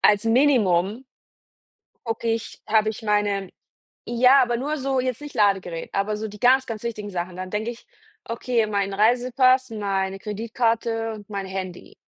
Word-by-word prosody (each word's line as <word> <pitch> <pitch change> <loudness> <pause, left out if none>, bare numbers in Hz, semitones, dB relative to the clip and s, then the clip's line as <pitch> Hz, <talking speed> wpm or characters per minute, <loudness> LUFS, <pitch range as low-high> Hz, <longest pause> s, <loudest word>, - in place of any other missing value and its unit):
als 210 +1 +4
Minimum 225 -5 +3 1.0
gucke 230 0 -2
ich, 225 -2 -7
habe 215 0 +3
ich 220 - -9
meine 205 -3 0 0.6
ja, 250 +3 +6
aber 240 -1 +1
nur 290 +6 -2
so, 265 -1 0
jetzt 255 -2 -2
nicht 295 -1 -9
Ladegerät, 190 -5 +1
aber 200 +2 -1
so 215 +1 -4
die 210 0 -12
ganz, 260 +2 +4
ganz 220 -2 -6
wichtigen 215 -3 -4
Sachen. 180 -1 -4
Dann 185 0 -6
denke 215 +4 -2
ich: 235 - -14 0.4
„Okay, 230 0 0
mein 200 -2 -1
Reisepass, 255 +4 +3
meine 195 -3 -2
Kreditkarte 225 +2 -1
und 210 -2 -11
mein 200 -2 -4
Handy.“ 190 -2 -6
220 Hz, 160 wpm, -24 LUFS, 200-240 Hz, 1.0 s, ja